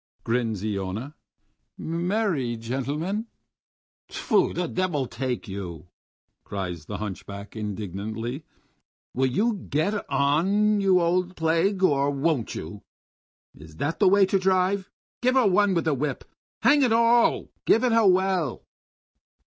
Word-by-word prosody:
"He -, -, -
he!" -, -, -46 dB
grins 110 Hz, -5 st, -1 dB
Iona. 105 Hz, +6 st, -3 dB, 0.6 s
"Me 170 Hz, +4 st, -2 dB
er 220 Hz, -2 st, +1 dB
ry 125 Hz, -7 st, -2 dB
gentlemen!" 145 Hz, -, -3 dB, 0.8 s
"Tfoo! -, -, +1 dB
the 180 Hz, -, -2 dB
devil 175 Hz, -8 st, -1 dB
take 125 Hz, 0 st, -4 dB
you!" 90 Hz, -4 st, -7 dB, 0.5 s
cries 90 Hz, -6 st, -5 dB
the -, -, -4 dB
hunchback 100 Hz, 0 st, -7 dB
indignantly. 110 Hz, -, -5 dB, 0.7 s
"Will 130 Hz, +1 st, +1 dB
you 215 Hz, -, +1 dB, 0.2 s
get 180 Hz, +9 st, 0 dB
on, 185 Hz, +10 st, +2 dB
you 190 Hz, -2 st, +4 dB
old 180 Hz, +1 st, 0 dB
plague, 165 Hz, +4 st, +1 dB
or 140 Hz, -5 st, +3 dB
won't 140 Hz, -3 st, -1 dB
you? 95 Hz, +6 st, -7 dB, 0.7 s
Is 80 Hz, 0 st, -14 dB
that 145 Hz, -, -2 dB
the -, -, +5 dB
way 200 Hz, 0 st, +5 dB
to 195 Hz, +1 st, +1 dB
drive? 190 Hz, +1 st, +1 dB, 0.3 s
Give 255 Hz, +1 st, +2 dB
her 260 Hz, -3 st, +4 dB
one 200 Hz, 0 st, +3 dB
with 170 Hz, -, 0 dB
the 160 Hz, -, +2 dB
whip. 140 Hz, +1 st, -2 dB, 0.4 s
Hang 290 Hz, 0 st, +5 dB
it 250 Hz, -4 st, +3 dB
all, 230 Hz, +1 st, +3 dB, 0.2 s
give 230 Hz, -, +4 dB
it 250 Hz, -, +2 dB
her 225 Hz, -2 st, +4 dB
well." 185 Hz, -6 st, +1 dB
155 Hz, 140 wpm, -25 LUFS, -, 0.8 s, the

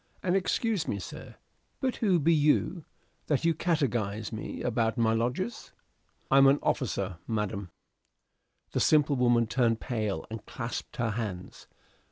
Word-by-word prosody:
And 180 Hz, 0 st, +2 dB
excuse 195 Hz, -1 st, 0 dB
me, 100 Hz, -, -1 dB
sir, 95 Hz, -, -9 dB, 0.4 s
but 260 Hz, -1 st, -1 dB
who 195 Hz, -6 st, +3 dB
be 165 Hz, +1 st, +3 dB
you, 155 Hz, +2 st, +2 dB, 0.4 s
that 145 Hz, -1 st, +1 dB
do 165 Hz, 0 st, +3 dB
catechise 120 Hz, -, -1 dB
me 110 Hz, -, -5 dB
to -, -, -2 dB
about 115 Hz, -2 st, 0 dB
my 115 Hz, -1 st, +3 dB
lodgers?" 125 Hz, -, -2 dB, 0.6 s
"I 135 Hz, -, +7 dB
am 135 Hz, -, +7 dB
an 140 Hz, +1 st, +5 dB
officer, 100 Hz, -8 st, -1 dB
madam." 105 Hz, -3 st, -2 dB, 1.0 s
The -, -, 0 dB
simple 150 Hz, -2 st, +4 dB
woman 120 Hz, -2 st, +3 dB
turned 115 Hz, -1 st, +1 dB
pale, 110 Hz, -5 st, -2 dB
and 110 Hz, -2 st, -6 dB
clasped 115 Hz, 0 st, -6 dB
her 115 Hz, -2 st, 0 dB
hands. 105 Hz, -5 st, -5 dB
120 Hz, 150 wpm, -29 LUFS, 110-155 Hz, 1.0 s, I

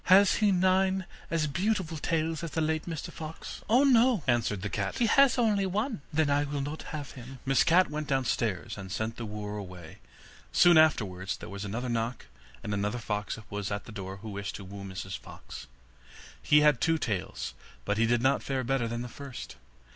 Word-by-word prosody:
'Has 195 Hz, +2 st, +6 dB
he 210 Hz, -2 st, +4 dB
nine 190 Hz, +1 st, +2 dB, 0.2 s
as 165 Hz, -2 st, +1 dB
beautiful 170 Hz, +1 st, -1 dB
tails 160 Hz, +1 st, -1 dB
as 165 Hz, -, -3 dB
the 160 Hz, -, -2 dB
late 160 Hz, 0 st, 0 dB
Mr 165 Hz, -3 st, -4 dB
Fox?' 160 Hz, 0 st, -8 dB
'Oh, 245 Hz, +5 st, +6 dB
no,' 245 Hz, -, +5 dB
answered 115 Hz, -6 st, +1 dB
the 105 Hz, -, -2 dB
cat, 100 Hz, -2 st, -2 dB
'he 240 Hz, -, +3 dB
has 275 Hz, +3 st, +5 dB
only 210 Hz, -5 st, +2 dB
one.' 210 Hz, -, -1 dB
'Then 155 Hz, 0 st, +2 dB
I 145 Hz, 0 st, +2 dB
will 145 Hz, -1 st, -3 dB
not 145 Hz, +3 st, -4 dB
have 145 Hz, -3 st, -5 dB
him.' 130 Hz, +1 st, -10 dB
Miss 135 Hz, 0 st, +4 dB
Cat 175 Hz, 0 st, +4 dB
went 150 Hz, 0 st, -3 dB
downstairs 115 Hz, -6 st, -1 dB
and 95 Hz, -1 st, -8 dB
sent 110 Hz, +3 st, -3 dB
the 115 Hz, -, -5 dB
wooer 105 Hz, 0 st, -5 dB
away. 90 Hz, -5 st, -9 dB, 0.5 s
Soon 175 Hz, -1 st, +6 dB
afterwards 105 Hz, -11 st, +3 dB
there -, -, -9 dB
was 100 Hz, 0 st, -6 dB
another 115 Hz, +5 st, -3 dB
knock, 115 Hz, 0 st, -2 dB, 0.4 s
and 105 Hz, -, -3 dB
another 105 Hz, +3 st, -1 dB
fox 105 Hz, -2 st, -3 dB
was 100 Hz, -1 st, -3 dB
at 100 Hz, 0 st, -3 dB
the -, -, -10 dB
door 95 Hz, -2 st, -6 dB
who 110 Hz, +3 st, -8 dB
wished 100 Hz, 0 st, -4 dB
to 100 Hz, -, -8 dB
woo 100 Hz, +1 st, -8 dB
Mrs 95 Hz, 0 st, -6 dB
Fox. -, -, -10 dB, 0.7 s
He 150 Hz, 0 st, +5 dB
had 150 Hz, -5 st, +4 dB
two 165 Hz, 0 st, +3 dB
tails, 105 Hz, -, -3 dB, 0.3 s
but 100 Hz, +1 st, 0 dB
he 115 Hz, -, +4 dB
did 120 Hz, 0 st, +2 dB
not 135 Hz, +1 st, +3 dB
fare 135 Hz, -2 st, -2 dB
better 125 Hz, -1 st, 0 dB
than 120 Hz, +1 st, -3 dB
the -, -, -5 dB
first. 135 Hz, 0 st, -8 dB
135 Hz, 200 wpm, -29 LUFS, 105-165 Hz, 0.7 s, Has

